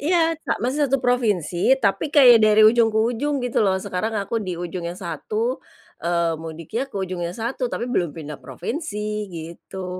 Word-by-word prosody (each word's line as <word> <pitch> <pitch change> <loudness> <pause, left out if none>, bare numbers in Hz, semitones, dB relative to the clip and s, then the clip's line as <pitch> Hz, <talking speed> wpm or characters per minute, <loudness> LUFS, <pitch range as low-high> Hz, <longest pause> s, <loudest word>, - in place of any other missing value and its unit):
iya, 330 +1 +2 0.2
sa - - +2
masih 280 +2 +1
satu 275 - +3
provinsi, 235 - +2
tapi 215 +6 0
kayak 250 -7 +7
dari 215 0 +6
ujung 230 0 +5
ke 215 - -3
ujung, 245 +6 0
gitu 245 - -1
loh. 190 -2 +2
Sekarang 215 +4 -3
aku 220 +3 -2
di 180 -3 -4
ujung 175 0 -5
yang 175 - -6
satu, 210 - -3 0.4
eee, 170 -1 +1
mudiknya 165 - -5
ke - - -8
ujung 185 -2 -3
yang 170 +1 -4
satu, 240 +2 -2
tapi - - -3
belum 200 -9 0
pindah 150 -2 -7
provinsi, 210 - -4
gitu. 170 +3 -8
215 Hz, 180 wpm, -22 LUFS, 175-245 Hz, 0.4 s, kayak